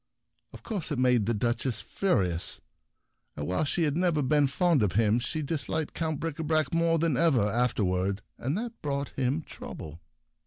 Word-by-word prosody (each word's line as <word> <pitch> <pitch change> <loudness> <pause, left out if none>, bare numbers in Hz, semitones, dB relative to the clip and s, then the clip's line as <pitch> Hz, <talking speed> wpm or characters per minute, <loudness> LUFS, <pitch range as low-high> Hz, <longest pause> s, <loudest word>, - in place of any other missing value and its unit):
Of - - -12
course 195 -8 -4
it 145 - -1
made 125 -4 +3
the 115 - +2
Duchess 120 +1 0
furious, 90 - 0 0.8
and 75 - -3
while 90 - 0
she 165 +4 0
had 150 -2 +1
never 170 -4 +2
been 145 +1 +3
fond 155 +2 +2
of 105 -4 +1
him, 110 +2 +3
she 150 +6 -3
disliked 155 +1 -2
Count 160 -3 -2
Bricabrac 160 0 -1
more 165 0 +3
than 160 -5 +1
ever 135 -9 +4
afterward; 100 -4 0
and 140 +8 -2
that 230 +1 -5
brought 140 -1 -2
him 135 +4 -1
trouble. 80 - -9
140 Hz, 165 wpm, -28 LUFS, 115-160 Hz, 0.8 s, ever